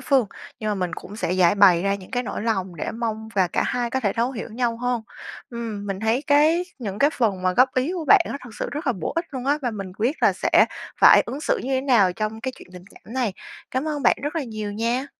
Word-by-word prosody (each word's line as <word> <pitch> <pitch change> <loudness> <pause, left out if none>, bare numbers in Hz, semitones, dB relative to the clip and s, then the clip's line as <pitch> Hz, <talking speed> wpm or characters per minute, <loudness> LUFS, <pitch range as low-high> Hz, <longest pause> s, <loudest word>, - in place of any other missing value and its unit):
phương. 260 -3 +2 0.3
Nhưng 215 -1 -1
mà - - 0
mình 180 -3 -2
cũng 205 - -10
sẽ 180 -5 -1
giãi 180 -1 +4
bày 185 -4 +6
ra 200 0 +1
những 190 -2 -10
cái 245 -1 -1
nỗi 210 - -5
lòng 190 -6 -2
để - - -3
mong 220 -1 -4
và 185 -3 +3
cả - - 0
hai 245 -1 -1
có 265 - -1
thể 205 -5 0
thấu 240 +3 0
hiểu 230 -1 -6
nhau 235 0 -1
hơn. 245 -1 -1 0.5
Ừm. 225 -4 -5
Mình 195 -1 -4
thấy 225 +5 +1
cái 310 +5 +4
những 205 -5 -5
cái 285 +2 +4
phần 210 - 0
mà 185 0 +2
góp 255 +6 +3
ý 260 +7 0
của 350 -3 -4
bạn 410 +3 +7
á - - -3
thực 225 - -11
sự - - -2
rất 295 +1 -5
là 250 - +3
bổ 180 -8 -4
ích 335 - +1
luôn 260 -2 -5
á, 290 +2 +2
và 245 - 0
mình 195 -4 -6
quyết 245 +8 0
là - - +5
sẽ - - +3 0.3
phải - - +8
ứng 275 - -5
xử - - 0
như - - -5
thế 260 - +1
nào 235 -9 +3
trong 215 +2 -4
cái 260 +3 -3
chuyện - - -14
tình 180 0 -11
cảm 220 - -15
này. 245 -7 0 0.4
Cảm 260 +3 -1
ơn 295 -2 -3
bạn - - +4
rất 295 +3 -3
là 300 - -1
nhiều 215 -3 -5
nha! 235 +5 -1
230 Hz, 275 wpm, -23 LUFS, 200-260 Hz, 0.5 s, phải